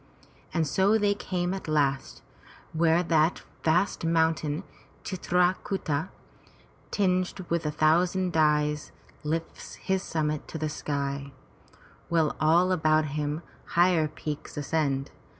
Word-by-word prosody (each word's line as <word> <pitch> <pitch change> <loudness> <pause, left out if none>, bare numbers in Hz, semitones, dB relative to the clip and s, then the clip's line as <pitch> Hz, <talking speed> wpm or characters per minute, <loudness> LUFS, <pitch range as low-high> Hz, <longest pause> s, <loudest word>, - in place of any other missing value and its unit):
And 165 -2 +1
so 195 +8 +3
they 205 -1 +2
came 180 -2 -2
at 195 - -6
last 140 -3 0 0.5
where 165 +1 +3
that 165 0 +2 0.2
vast 175 +4 +2
mountain 160 -1 +1 0.4
Chit 185 -3 -6
ra 180 0 +5
ku'ta, 165 -4 -2 0.8
tinged 185 -1 0
with 170 -2 0
a - - 0
thousand 175 +4 +2
dyes, 150 -1 +2 0.3
lifts 160 +2 -4
his 190 -1 -1
summit 155 -4 -2
to - - -6
the 155 0 -2
sky, 140 -2 -3 0.8
while 165 -2 +2
all 170 +4 +4
about 155 -3 +2
him 150 +2 -2 0.3
higher 175 -3 +4
peaks 150 -1 -6
ascend. 140 -2 -1
160 Hz, 120 wpm, -27 LUFS, 150-180 Hz, 0.8 s, ra